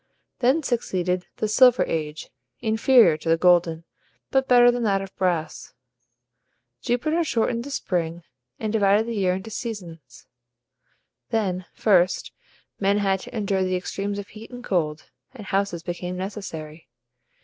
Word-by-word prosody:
Then 265 +6 +2
succeeded 185 -7 -1
the 215 - -1
Silver 250 +3 +5
Age, 155 -1 -4 0.3
inferior 220 -5 +4
to 165 - -5
the 165 - +4
golden, 170 -2 +3 0.5
but 265 -1 +2
better 245 -1 +7
than 245 0 -3
that 200 -4 +2
of 195 - -11
brass. 175 -5 -2 1.1
Jupiter 310 +8 0
shortened 235 -4 0
the - - -7
spring, 170 -9 -2 0.4
and 215 0 -3
divided 205 0 +3
the 235 - -4
year 185 -4 +1
into 195 +4 -7
seasons. 170 - -7 1.0
Then, 185 -5 -1
first, 185 -4 +2 0.5
men 200 +1 +2
had 195 -2 +1
to 230 - -8
endure 195 -3 0
the 185 0 0
extremes 200 +2 -3
of 205 0 -7
heat 220 +1 -11
and 245 0 -10
cold, 155 -7 -2 0.2
and 215 -5 -9
houses 195 -4 -1
became 180 +1 -5
necessary. 165 - -7
195 Hz, 140 wpm, -24 LUFS, 175-225 Hz, 1.1 s, better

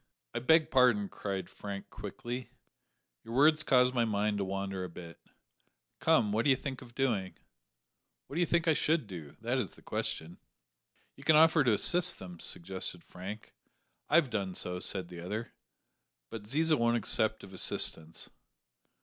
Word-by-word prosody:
"I 120 - -2
beg 160 +6 +3
pardon," 125 -6 +4
cried 95 -3 -4
Frank 100 -1 -8
quickly, 120 +4 -6 0.7
"your 115 - -7
words 150 +3 +5
caused 125 -3 +3
my 120 -2 +2
mind 105 -1 0
to - - 0
wander 95 0 -4
a 90 - -5
bit. 85 0 -11 0.8
Come, 105 - +3
what 110 +2 +1
do - - +2
you 135 - +6
think 130 0 -6
of 120 -2 -14
doing?" 110 -9 -1 0.9
"What - - -13
do 165 - -2
you 175 - +2
think 170 0 +1
I 160 - +5
should 155 -2 +1
do? 85 -8 -10
that - - -1
is - - -3
the - - -19
question." 80 +2 -4 0.8
"You 135 - -14
can 155 +2 +5
offer 160 0 +6
to 120 -5 +3
assist 175 - +6
them," 90 -2 -10
suggested 90 0 -2
Frank. 100 +4 -9 0.6
"I've 155 -6 +4
done 95 -4 -2
so," 90 0 -4
said 95 -1 -1
the 90 -1 -9
other, 105 +7 -5 0.8
"but 110 -2 -7
Ziza 155 +6 +2
won't 115 0 +2
accept 110 +1 +2
of 95 - -12
assistance." 80 -3 -2
110 Hz, 165 wpm, -31 LUFS, 95-135 Hz, 0.9 s, you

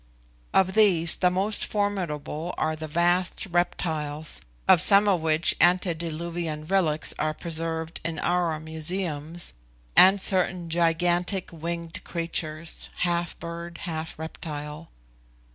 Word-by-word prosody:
Of 190 0 +3
these 185 -6 +5
the 180 - +3
most 195 +4 +1
formidable 175 -6 -3
are 155 0 0
the 155 0 -6
vast 175 +3 +1
reptiles, 160 -4 -1 0.3
of 165 - +6
some 200 0 +6
of 185 -5 +2
which 160 +1 +3
antediluvian 170 -2 0
relics 160 -4 +1
are 155 0 -1
preserved 165 0 -4
in 165 -1 -3
our 175 -3 0
museums, 160 0 -2 0.4
and 190 +2 +7
certain 180 -3 0
gigantic 175 +3 +1
winged 170 0 -5
creatures, 165 -1 -2
half 175 -1 -1
bird, 170 0 -8
half 160 -2 -5
reptile. 155 0 -7
170 Hz, 110 wpm, -26 LUFS, 160-180 Hz, 0.4 s, and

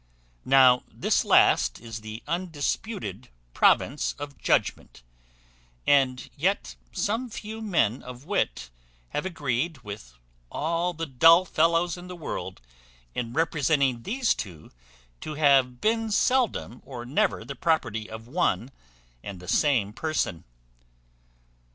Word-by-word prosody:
Now 130 -2 +6
this - - +1
last - - +4
is 115 -1 -8
the 110 +1 -8
undisputed 165 - -3 0.2
province 145 - +2
of 145 -1 -7
judgment, - - -1 0.8
and 135 -3 +3
yet - - -1 0.2
some 230 +5 -1
few 220 0 -7
men 165 - +1
of 125 +2 -10
wit 60 - -1 0.4
have 150 - -2
agreed 145 -3 -2
with 100 - -9 0.4
all 170 +3 -1
the 165 +1 -3
dull 165 +6 +6
fellows 165 +1 +2
in 175 0 -10
the 180 - -7
world 165 - -6 0.5
in 115 -2 -3
representing 140 -5 +1
these 245 - +1
two 85 -6 -8 0.5
to 155 - -6
have 135 -4 +3
been 225 +1 +1
seldom 230 - +1
or 120 -3 -8
never 130 +4 0
the 140 - -6
property 115 -11 0
of 110 +1 -9
one 135 -3 0 0.5
and 100 -3 -7
the 90 - -12
same 110 - +2
person. 155 - -2
140 Hz, 120 wpm, -26 LUFS, 115-170 Hz, 0.8 s, Now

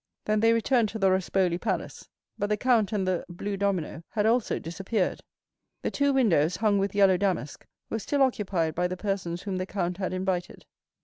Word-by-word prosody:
Then 215 0 +2
they 225 +1 +4
returned 230 0 +2
to 220 - -5
the 195 -3 +3
Rospoli 185 -1 +1
Palace; - - -3 0.3
but 205 - -2
the 210 - +1
count 230 -3 +2
and 200 -3 -1
the 185 -2 0
blue 200 +3 -4
domino 190 -6 -1
had 210 -1 0
also 230 +1 +2
disappeared; 190 +4 -2 0.6
the - - -1
two 285 0 +2
windows, 180 - +3
hung 210 -2 +2
with 195 0 -1
yellow 195 -2 +5
damask, 185 -6 -2 0.2
were 225 - -3
still 280 +6 +1
occupied 190 -10 0
by 180 +2 0
the 185 +1 -5
persons 185 -3 -3
whom 195 -2 -3
the 185 0 -3
count 180 -3 -2
had 190 -2 -2
invited. 185 -1 -3
195 Hz, 190 wpm, -27 LUFS, 180-215 Hz, 0.6 s, yellow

